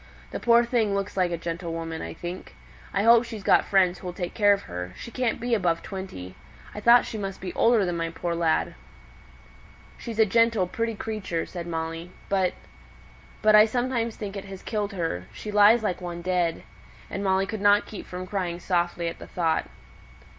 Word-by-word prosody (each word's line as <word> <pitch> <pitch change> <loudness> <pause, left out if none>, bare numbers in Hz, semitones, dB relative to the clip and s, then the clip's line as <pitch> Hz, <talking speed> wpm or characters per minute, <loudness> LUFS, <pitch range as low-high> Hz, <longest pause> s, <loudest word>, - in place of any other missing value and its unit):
This - - -5
poor 235 0 +5
thing 225 -4 +1
looks 200 0 -3
like 185 -2 +2
a 170 - -2
gentlewoman, 165 -1 -4
I - - -6
think. 175 +2 -7 0.4
I 200 - 0
hope 230 +1 +7
she's 225 -4 -8
got - - +4
friends 185 -2 +3
who'll 180 -1 -6
take 175 -1 -4
care 205 -2 +4
of 200 0 +2
her, 90 0 -6
she 235 - -8
can't 250 -1 -1
be 240 0 -1
above 175 -6 +1
twenty. 140 - -7 0.4
I - - -6
thought 235 +3 +6
she 220 - -5
must 195 -1 -5
be 180 -1 -6
older 230 -3 +4
than 175 -1 -2
my 165 0 -1
poor 170 +1 -3
lad!" 165 -1 +1 1.3
"She's 230 -2 -6
a 220 - +6
gentle, 230 -1 +3
pretty 230 +5 -2
creature," 205 -6 -3
said 175 -2 -7
Molly. 165 +1 -4 0.2
"But 190 -2 +2 0.9
but 215 0 +6
I 215 0 +9
sometimes 235 -1 -1
think 205 -2 -6
it 200 - -6
has 195 -1 -9
killed 210 -2 -2
her; 165 - -3
she 210 - -7
lies 210 +3 +6
like 185 -3 -1
one 175 -1 -6
dead." 180 -2 0 0.4
And 195 - -4
Molly 190 0 +2
could 210 +1 -5
not 205 0 +5
keep 210 - -9
from 180 0 -6
crying 185 -3 -3
softly 175 -1 0
at 165 - -5
the - - -10
thought. 165 -3 0
195 Hz, 195 wpm, -26 LUFS, 175-215 Hz, 1.3 s, I